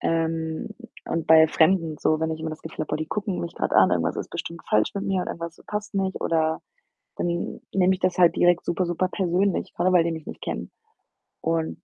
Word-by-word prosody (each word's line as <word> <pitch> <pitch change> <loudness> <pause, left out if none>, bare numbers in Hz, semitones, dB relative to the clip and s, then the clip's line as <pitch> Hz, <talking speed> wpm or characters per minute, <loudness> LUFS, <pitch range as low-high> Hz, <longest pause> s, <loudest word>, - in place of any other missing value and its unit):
Ähm, 160 -1 -1 0.4
und 165 -1 -2
bei 160 0 +7
Fremden 160 -2 +2
so, 155 0 +1
wenn 160 0 0
ich 160 - -3
immer 160 0 -3
das 155 - -9
Gefühl 160 -1 -5
habe: - - -11
„Oh, - - +1
die 155 - -4
gucken 205 -3 -2
mich 170 -1 -5
grad - - -2
an, - - +6
irgendwas - - 0
ist - - -5
bestimmt 170 0 -6
falsch 105 0 +3
mit 200 - -3
mir 190 -2 0
oder - - -4
irgendwas 170 0 -8
passt 210 0 -4
nicht,“ 190 -1 -1
oder 160 -1 +1 0.6
dann 170 0 -2
nehme 190 0 +4
ich 185 - -4
das 185 0 0
halt 175 -2 +5
direkt 175 0 +3
super, 180 +2 0
super 175 +2 0
persönlich, 185 0 0
grade 180 +2 +1
weil 175 - +6
die 170 - -1
mich 160 -2 -6
nicht - - -9
kennen - - -4 0.7
und 165 -1 -1
170 Hz, 225 wpm, -25 LUFS, 160-185 Hz, 0.7 s, bei